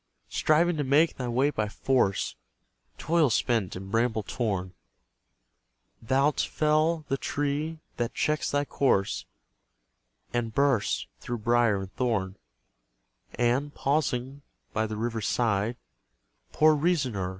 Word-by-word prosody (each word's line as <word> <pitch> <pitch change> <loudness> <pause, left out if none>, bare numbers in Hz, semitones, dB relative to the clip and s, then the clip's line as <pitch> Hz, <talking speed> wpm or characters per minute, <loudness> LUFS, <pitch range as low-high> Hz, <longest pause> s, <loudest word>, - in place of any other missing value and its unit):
Striving 165 +2 +2
to 145 - 0
make 145 +5 +3
thy 125 - -3
way 130 +5 +2
by 105 -6 -2
force, 105 - 0 0.6
Toil 165 -3 +2
spent 110 -3 0
and 95 +1 -8
bramble 115 -1 +1
torn, 100 -6 -2 1.3
Thou'lt 135 +5 +2
fell 155 +1 +1
the 135 - 0
tree 145 +4 -2 0.2
that 120 -1 -2
checks 150 -4 0
thy 145 0 0
course, 130 -9 +1 1.1
And 115 -2 -2
burst 140 -7 +2
through 120 - -4
brier 115 -2 +2
and 95 -1 -8
thorn: 105 -6 -1 1.0
And, 125 +5 0
pausing 135 -2 -1 0.3
by 110 0 0
the 110 0 -5
river's 115 -1 -2
side, 115 0 0 0.7
Poor 155 0 +5
reasoner! 140 - 0
125 Hz, 115 wpm, -27 LUFS, 110-145 Hz, 1.3 s, Poor